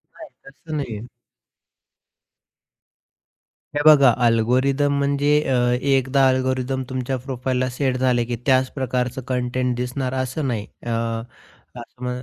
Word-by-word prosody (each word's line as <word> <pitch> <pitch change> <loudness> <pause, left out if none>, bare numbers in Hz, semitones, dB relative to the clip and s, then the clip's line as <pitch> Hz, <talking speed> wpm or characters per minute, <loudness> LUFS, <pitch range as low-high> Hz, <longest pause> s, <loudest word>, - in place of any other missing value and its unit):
नाही - - -11 0.2
तसं 155 +3 -9
नाहीये. 120 -5 -5 2.7
हे 145 - +1
बघा 140 -4 +8 0.2
अल्गोरिथम 130 +5 +2
म्हणजे? 140 +1 +1 0.2
अ, 130 - +2 0.3
एकदा 135 0 +3
अल्गोरिथम 130 0 0
तुमच्या 130 0 -2
प्रोफाइलला 130 -1 -1
सेट 130 0 -1
झाले, 125 -2 +2
की 120 0 -3
त्याच 130 -1 +3
प्रकारचं 125 -1 -2
कंटेंट 125 0 -1
दिसणार 125 +1 -3
असं 130 +3 -3
नाही. 110 -5 -2 0.2
अ, - - -4 0.9
अ, - - -6 0.2
म 125 - -2
130 Hz, 120 wpm, -22 LUFS, 125-135 Hz, 2.7 s, बघा